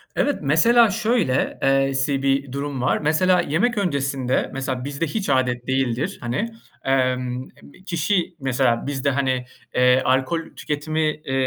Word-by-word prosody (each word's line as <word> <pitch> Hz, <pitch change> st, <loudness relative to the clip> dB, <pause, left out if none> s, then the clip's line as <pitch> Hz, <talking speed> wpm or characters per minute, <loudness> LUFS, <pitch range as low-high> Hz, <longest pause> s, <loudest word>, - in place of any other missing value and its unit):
Evet, 290 Hz, -, +1 dB
mesela 220 Hz, -, +5 dB
şöyle 215 Hz, -, 0 dB
e 135 Hz, 0 st, +2 dB
si 135 Hz, 0 st, 0 dB
bir 135 Hz, 0 st, +1 dB
durum 140 Hz, -1 st, -4 dB
var. 125 Hz, -, +2 dB
Mesela, 175 Hz, +4 st, +2 dB
yemek 200 Hz, +10 st, 0 dB
öncesinde, 140 Hz, -8 st, 0 dB
mesela, 130 Hz, -1 st, -3 dB
bizde 145 Hz, +3 st, -2 dB
hiç 195 Hz, +4 st, -3 dB
âdet 125 Hz, -2 st, +1 dB
değildir, 130 Hz, 0 st, -1 dB
hani. 130 Hz, -, -2 dB, 0.3 s
Emm 130 Hz, -1 st, 0 dB, 0.2 s
m -, -, -15 dB
kişi, 175 Hz, 0 st, 0 dB
mesela, 130 Hz, -2 st, 0 dB
bizde, 140 Hz, 0 st, -1 dB
hani, 130 Hz, -2 st, 0 dB, 0.3 s
eee, 125 Hz, +1 st, +4 dB
alkol 130 Hz, +6 st, +1 dB, 0.2 s
tüketimi, 155 Hz, +2 st, -2 dB
eee, 150 Hz, -3 st, -7 dB
135 Hz, 140 wpm, -22 LUFS, 130-160 Hz, 0.3 s, mesela